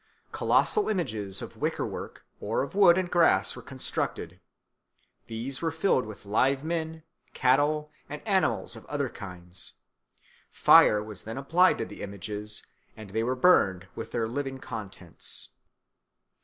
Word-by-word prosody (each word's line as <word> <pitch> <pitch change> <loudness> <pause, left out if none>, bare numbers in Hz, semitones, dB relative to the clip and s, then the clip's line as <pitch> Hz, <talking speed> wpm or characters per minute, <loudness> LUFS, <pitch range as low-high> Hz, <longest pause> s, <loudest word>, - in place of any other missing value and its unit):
Colossal 425 - +2
images 110 - -2
of - - -9
wicker - - -1
work - - -7
or 110 +5 -1
of 140 - -7
wood 190 -3 +6
and 185 -2 -1
grass 175 -1 +4
were - - -9
constructed; - - -4 0.9
these 120 +4 -4
were 165 - +1
filled 160 - +1
with 105 -1 -10
live 130 +7 +2
men, 160 -1 -3 0.3
cattle, 150 +4 +2 0.2
and 150 +8 -8
animals 195 -3 +1
of - - -11
other 140 -3 -1
kinds; 90 -3 -7 0.8
fire 105 0 +6
was 105 -3 -8
then 110 +3 -7
applied 170 +7 +4
to - - -2
the - - -10
images, 105 +1 -5 0.3
and 110 -3 -10
they 110 +2 0
were 125 +3 0
burned 95 - +3
with 115 0 -7
their 115 -2 -1
living 135 +2 -3
contents. 105 -9 -6
130 Hz, 140 wpm, -28 LUFS, 105-160 Hz, 0.9 s, wood